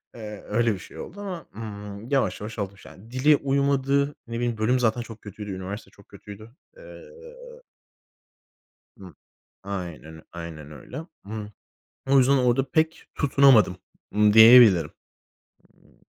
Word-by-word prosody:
eee, 105 -3 -9
öyle 115 +1 +1
bir 95 - -7
şey - - -12
oldu 200 +4 -9
ama, 180 -6 -6
ımm, 105 0 -8
yavaş 130 -9 0
yavaş 110 +1 -7
alış 100 -3 -6
yani 95 +9 -15
dili 145 +4 +4
uymadı, 140 0 0
ne 115 - -6
bileyim 120 -2 -2
bölüm 125 +4 +1
zaten 120 0 +1
çok 115 -2 -11
kötüydü, 105 0 -8
üniversite 95 +3 -7
çok 100 - -21
kötüydü. 105 +2 -12 0.3
Eee - - -13 2.0
Hı. 95 -5 -13 0.5
Aynen 85 -6 -7
öyl 80 - -12
aynen 80 -3 -9
öyle. 155 - -9 0.2
Imm, 105 0 -6 0.6
o 135 - +5
yüzden 135 +1 +4
orada 130 +1 +1
pek 160 0 0
tutunamadım, 135 - +4 0.4
ımm, 105 0 +4
diyebilirim, 110 -8 +8 1.0
ımm - - -28
110 Hz, 140 wpm, -24 LUFS, 100-135 Hz, 2.0 s, diyebilirim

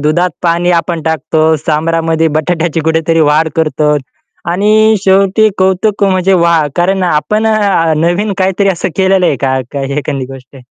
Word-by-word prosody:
दुधात 155 +5 0
पाणी 175 +1 +1
आपण 170 -1 -5
टाकतो, 160 0 -1 0.2
सांबरामध्ये 160 +1 0
बटाट्याची 165 0 -1
कुठेतरी 160 0 +1
वाढ 155 +2 +2
करतो. 155 -2 +1 0.6
आणि 215 +4 +3
शेवटी 195 +2 +3
कौतुक 190 +3 0
म्हणजे 190 -1 +1
वाह! 170 -3 +2
कारण 185 +2 0
आपण 180 +6 0
अ, 200 -7 +1
नवीन 175 +6 0
काहीतरी 190 +1 +1
असं 185 -4 -1
केलेलं 190 -1 +2
आहे 140 - 0
का, 130 -1 0
का 140 -1 -4
एखादी 140 -2 -3
गोष्ट? 135 +1 -13
170 Hz, 145 wpm, -11 LUFS, 155-190 Hz, 0.6 s, आणि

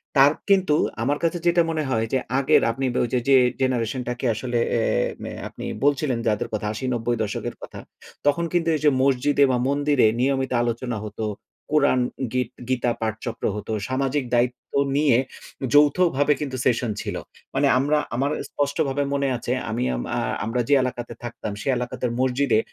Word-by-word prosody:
তার 140 +1 +7 0.2
কিন্তু 190 -6 +4 0.3
আমার 145 +4 +1
কাছে 170 +1 +1
যেটা 170 0 +4
মনে 155 -1 -1
হয় 115 -2 +1
যে, - - +4 0.2
আগের 135 - +4
আপনি 135 +4 -3
বা - - 0
ওই 120 - -2
যে, 125 - +3
যে, 135 - +7 0.3
generation 125 -1 0
টাকে 125 +2 -4
আসলে 120 +2 -3
অ্যা 115 - +1 0.4
ম্যা - - -5
আপনি - - -8 0.2
বলছিলেন 145 -3 +2
যাদের 105 -1 0
কথা, 105 -1 -2
৮০-৯০-দশকের 120 -4 -2
কথা। - - -9 0.5
তখন 155 +4 +2
কিন্তু 170 -1 +2
এই 150 - -3
যে, - - +8
মসজিদে 140 +2 +3
বা 125 - +2
মন্দিরে 145 -2 +2
নিয়মিত 135 0 +1
আলোচনা 120 0 -2
হত, 105 0 -10 0.5
কোরআন, 145 -4 +3 0.3
গীত, 125 -2 0 0.2
গীতা 125 -2 +1
পাঠচক্র 110 +1 -4
হতো, 105 +1 -5 0.2
সামাজিক 135 +2 0
দায়িত্ব 120 +1 -1 0.2
নিয়ে 145 -5 +4 0.6
যৌথভাবে 145 0 +4
কিন্তু 135 -3 -3
সেশন 120 -2 +1
ছিল। - - -4 0.4
মানে 140 +1 +3
আমরা, 145 +3 +2 0.2
আমার 140 +4 0 0.2
স্পষ্টভাবে 145 -1 0
মনে 140 -1 +1
আছে, - - -4 0.2
আমি - - -1
আম - - -3
আ - - +1 0.3
আমরা 120 +2 0
যে, 145 - +3
এলাকাতে 120 -2 -4
থাকতাম 120 -3 -5
সে - - -7
এলাকার 125 0 -3
মসজিদে 130 -2 +2
130 Hz, 165 wpm, -23 LUFS, 120-145 Hz, 0.6 s, যে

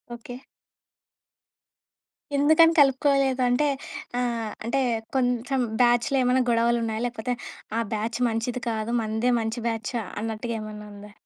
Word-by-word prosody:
Okay. 245 +1 -9 2.0
ఎందుకని 315 +4 +5
కలుపుకోలేదు? 275 -1 +3
అంటే, 250 +5 +2 0.5
ఆహ్, 235 -3 -1 0.2
అంటే 235 +4 0 0.4
కొంచెం 250 +1 +1 0.2
బ్యాచ్‌లో 240 +2 +3
ఏమేనా 250 +1 +3
గొడవలున్నాయా? 230 -1 +1
లేకపోతే 245 0 -2 0.4
ఆ - - +2
బ్యాచ్ 220 +2 -2
మంచిది 230 +2 -2
కాదు. 220 0 -2
మనదే 220 +3 0
మంచి 225 +2 -3
బ్యాచ్ 225 +1 -4 0.3
అన్నట్టుగా 225 +1 -3
ఏమన్నా 210 0 -8
ఉందా? 205 +1 -11
235 Hz, 110 wpm, -25 LUFS, 225-255 Hz, 2.0 s, ఎందుకని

